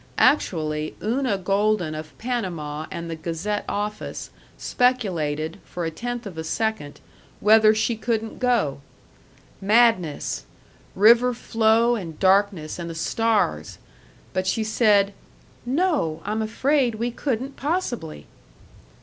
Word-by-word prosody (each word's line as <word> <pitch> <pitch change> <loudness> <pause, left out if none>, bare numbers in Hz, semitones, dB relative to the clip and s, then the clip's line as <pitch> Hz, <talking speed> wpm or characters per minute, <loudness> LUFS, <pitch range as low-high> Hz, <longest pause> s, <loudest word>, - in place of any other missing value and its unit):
Actually, 155 - +1
Una 235 -1 0
Golden 195 -2 +1
of 155 0 -8
Panama 170 -11 -3
and 170 0 -6
the 165 - -4
Gazette 170 +6 -3
office 210 +1 -4 0.3
speculated, 175 -10 0
for 175 -1 -5
a 165 - -2
tenth 245 +6 -5
of 180 -5 -7
a - - -3
second, 160 -3 -2 0.4
whether 215 +1 +6
she 225 +2 +1
couldn't 225 0 -3
go. 230 - +1 0.8
Madness 210 -6 +2 0.5
river 235 +5 +5
flow 230 0 +2
and 165 -8 -7
darkness 190 -5 +2
and 170 -1 -5
the 165 - -6
stars! 225 +6 0 0.6
But 185 0 -1
she 220 +3 +1
said, 210 -2 +3 0.5
"No, 270 - 0
I'm 215 +2 -1
afraid 250 +2 +1
we 235 +2 -2
couldn't 265 +2 -3
possibly!" 245 - -3
210 Hz, 115 wpm, -24 LUFS, 165-235 Hz, 0.8 s, whether